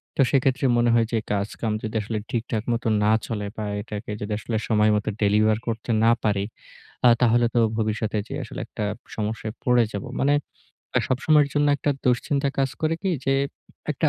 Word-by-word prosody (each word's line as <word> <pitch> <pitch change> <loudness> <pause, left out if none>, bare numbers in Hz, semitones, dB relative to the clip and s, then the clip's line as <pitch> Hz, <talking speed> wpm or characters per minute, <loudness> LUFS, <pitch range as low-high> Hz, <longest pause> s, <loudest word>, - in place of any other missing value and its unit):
তো - - +3
সেক্ষেত্রে 135 -1 +2
মনে 120 0 +3
হয় 115 -1 +4
যে - - +3 0.2
কাজকাম 105 +2 -2
যদি 110 +1 -4
আসলে 110 +1 -3
ঠিকঠাক 115 -2 -2
মতো 115 0 -2 0.2
না 105 - +4 0.2
চলে। 105 -3 -3
বা 110 - -3 0.2
এটাকে 105 0 -6
যদি 105 +1 -4
আসলে 110 +1 -2
সময় 105 -1 +3
মতো 105 +1 -1
আ - - -12
ডেলিভার 105 +1 +3
করতে 115 0 -4
না 115 - +6
পারি, 100 -2 +1 0.8
তাহলে 120 0 +4
তো - - +3 0.2
ভবিষ্যতে 110 -1 -1
যে - - -6
আসলে - - -8
একটা 105 - -5 0.3
সমস্যায় 110 0 -3
পড়ে 125 -1 +4
যাবো। 100 - -5
মানে 140 +2 +3 0.6
আ - - +7
সবসময়ের 145 +3 +3
জন্য 145 0 +3
একটা 145 - 0
দুশ্চিন্তা 140 +3 +1
কাজ 135 -1 +2
করে 155 0 +1
কি 195 - +1
যে 135 - +2 0.6
একটা - - +1
115 Hz, 185 wpm, -24 LUFS, 105-130 Hz, 0.8 s, আ